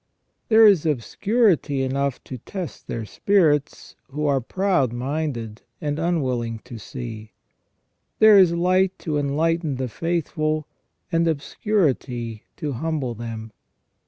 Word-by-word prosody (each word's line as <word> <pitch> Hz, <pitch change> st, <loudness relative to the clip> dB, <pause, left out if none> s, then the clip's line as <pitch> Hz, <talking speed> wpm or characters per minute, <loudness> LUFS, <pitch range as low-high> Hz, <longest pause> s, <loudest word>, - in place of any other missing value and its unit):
There 220 Hz, 0 st, +7 dB
is 195 Hz, -7 st, +6 dB
obscurity 160 Hz, -, +1 dB
enough 135 Hz, 0 st, -1 dB
to 130 Hz, -, -8 dB
test 180 Hz, -, -7 dB
their 115 Hz, -2 st, -4 dB
spirits 155 Hz, -, +1 dB
who 150 Hz, +2 st, -3 dB
are 140 Hz, -2 st, +2 dB
proud 180 Hz, -, +1 dB
minded 120 Hz, -4 st, -3 dB, 0.2 s
and 145 Hz, 0 st, -2 dB
unwilling 130 Hz, -9 st, -1 dB
to 115 Hz, -, -9 dB
see. 110 Hz, -1 st, -8 dB, 0.8 s
There 215 Hz, -2 st, +8 dB
is 185 Hz, -3 st, +6 dB
light 185 Hz, +2 st, +2 dB
to 150 Hz, -3 st, -2 dB
enlighten 155 Hz, +2 st, 0 dB
the 130 Hz, 0 st, -2 dB
faithful, 155 Hz, 0 st, -1 dB, 0.5 s
and 165 Hz, 0 st, +2 dB
obscurity 140 Hz, -, -1 dB, 0.2 s
to 150 Hz, -4 st, -3 dB
humble 140 Hz, -2 st, -2 dB
them. 115 Hz, -1 st, -7 dB
145 Hz, 120 wpm, -23 LUFS, 125-170 Hz, 0.8 s, There